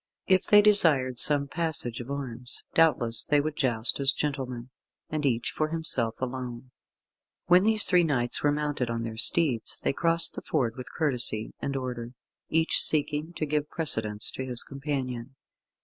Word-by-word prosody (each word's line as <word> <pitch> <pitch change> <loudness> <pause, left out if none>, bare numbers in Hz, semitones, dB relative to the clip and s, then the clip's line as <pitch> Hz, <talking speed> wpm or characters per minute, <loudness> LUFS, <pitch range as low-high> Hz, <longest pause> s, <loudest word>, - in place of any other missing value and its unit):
If 185 -1 +2
they 205 0 +6
desired 150 - +4
some 145 -1 +3
passage 150 -6 -2
of 120 +1 -8
arms, 125 -3 -5
doubtless 120 -8 +3
they 145 - +2
would 150 +1 -3
joust 120 -4 +1
as 140 -1 +3
gentlemen, 130 -4 -4 0.4
and 150 -2 -1
each 120 -2 -1
for 155 - -1
himself 135 -8 -2
alone. 125 -1 -6 0.7
When 180 +1 +5
these 215 +1 +6
three 180 -2 +3
knights 125 -7 0
were 145 - +2
mounted 145 -4 -2
on 115 0 -3
their 115 -1 -6
steeds, 130 -2 +2
they - - 0
crossed 165 +1 +1
the - - -6
ford 115 -3 -1
with 125 - -9
courtesy 125 -7 -2
and 140 0 -4
order, 125 -2 -5 0.4
each 160 0 +2
seeking 155 +2 0
to 155 - -3
give 150 0 -2
precedence 110 -10 0
to 130 - -6
his 125 -2 0
companion. 135 -3 -5
135 Hz, 165 wpm, -27 LUFS, 120-155 Hz, 0.7 s, they